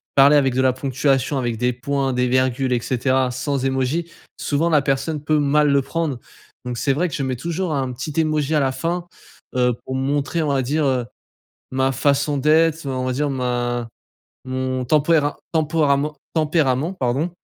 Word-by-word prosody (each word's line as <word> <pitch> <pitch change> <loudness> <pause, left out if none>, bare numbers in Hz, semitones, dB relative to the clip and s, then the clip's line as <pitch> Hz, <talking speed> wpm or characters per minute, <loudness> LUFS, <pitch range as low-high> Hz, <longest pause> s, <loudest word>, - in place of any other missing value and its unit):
parler 140 +2 +7
avec 135 -3 +3
de 130 - +1
la 130 -1 +3
ponctuation, 135 +1 0
avec 120 -3 -1
des 125 +2 +1
points, 135 +2 -1
des 125 0 +1
virgules 130 0 +1
et 120 - +2
cetera 130 +1 +1
sans 130 +2 -2
émoji, 135 +6 -1 0.3
souvent 155 +4 0
la 150 -3 +4
personne 140 +2 -1
peut 155 0 +2
mal 145 +1 +3
le 140 0 +4
prendre. 155 -2 -2 0.5
Donc, 125 -1 -4
c'est 140 - +1
vrai 160 +7 +1
que 165 - -5
je 145 - -2
mets 130 -1 -1
toujours 170 +5 -2
un 130 -3 -1
petit 130 +5 -5
Emoji 155 -1 +1
à 155 - +4
la 135 -2 +1
fin, 170 +6 -3 0.5
heu, 125 -1 +3
pour 130 - -4
montrer 140 +4 -1
on - - -1
va 140 -1 +1
dire 145 +4 0
heu, 130 -3 +1 0.7
ma 130 0 +1
façon 140 +2 +1
d'être, 160 +2 +3
heu, - - -2
on 130 -1 -2
va 130 - -1
dire 145 +3 -1
ma 120 -2 -2 0.6
mon 130 0 -2
tempéra 150 +2 +2
tempérament- 150 -2 +1 0.2
tempérament 155 -1 +1
pardon, 140 0 -1
140 Hz, 185 wpm, -21 LUFS, 130-150 Hz, 0.7 s, parler